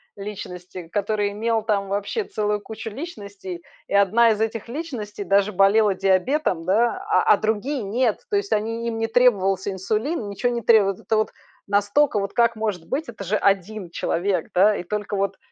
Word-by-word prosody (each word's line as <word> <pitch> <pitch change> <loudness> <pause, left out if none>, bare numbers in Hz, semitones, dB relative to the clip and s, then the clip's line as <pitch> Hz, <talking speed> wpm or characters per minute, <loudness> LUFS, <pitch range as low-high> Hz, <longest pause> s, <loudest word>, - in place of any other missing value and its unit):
личности, 185 -3 -8
который 205 +1 -1
имел 225 +1 0
там 205 -3 0
вообще 205 - -1
целую 210 - -1
кучу 220 +1 -7
личностей. 200 - -8 0.2
И - - -6
одна 215 +4 +5
из 215 -1 +1
этих 225 0 -2
личностей 235 -7 -5
даже 200 +2 +2
болела 200 +2 +4
диабетом, 190 - +1
да, 235 - +1
а 425 - +4
а - - +3
другие- 225 +6 -1
нет! 225 - 0
То 410 - +2
есть 405 0 -3
они 225 +2 -1
им 225 -1 -3
не 225 - 0
требовался 205 -5 +2
инсулин, 215 - -2
ничё 200 +5 -1
не 240 -1 -2
требовалось. 205 -4 +4
Это 220 - -1
вот, 215 - 0 0.4
настолько, 205 +5 +2
вот 200 0 -3
как 235 -1 +3
может 205 -6 -3
быть, 300 +4 -2
это 215 -4 -8
же 195 +3 -1
один 195 -1 0
человек, 180 +1 -1
да? 205 +4 +5
И - - -4
только 205 +2 -3
вот 200 0 -1
210 Hz, 180 wpm, -23 LUFS, 195-230 Hz, 0.4 s, одна